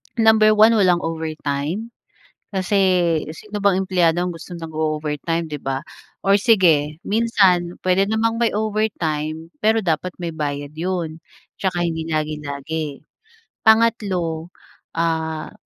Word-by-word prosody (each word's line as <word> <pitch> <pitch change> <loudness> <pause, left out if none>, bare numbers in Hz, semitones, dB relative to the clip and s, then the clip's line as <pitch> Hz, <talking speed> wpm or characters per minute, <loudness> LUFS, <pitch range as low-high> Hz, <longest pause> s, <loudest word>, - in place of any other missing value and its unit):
Number 220 -1 +5
1, 215 +2 +7
walang 180 -4 +3
overtime 160 +5 -3 0.6
kasi 190 +1 -1 0.5
sino 205 +5 -7
bang 195 -2 +3
empleyado 175 -3 +2
ang 180 -1 -2
gusto 165 +2 -9
nag-o-overtime, 155 0 -2
'di 150 -2 -5
ba? 135 0 -2 0.4
Or 195 0 +4
sige, 175 -9 +3
minsan 195 -6 +2
puwede 185 +2 +2
namang 225 +1 +1
may 230 - +3
overtime, 165 -8 -2
pero 220 +1 +4
dapat 170 0 -1
may 170 -2 -4
bayad 145 -1 -4
'yon 165 -1 -3 0.4
'tsaka 180 -2 -1
hindi 160 -1 -3
lagi-lagi. 150 -1 -4 0.5
Pangatlo, 200 -8 +2 0.5
ah, 160 -1 -1
170 Hz, 115 wpm, -21 LUFS, 155-200 Hz, 0.6 s, 1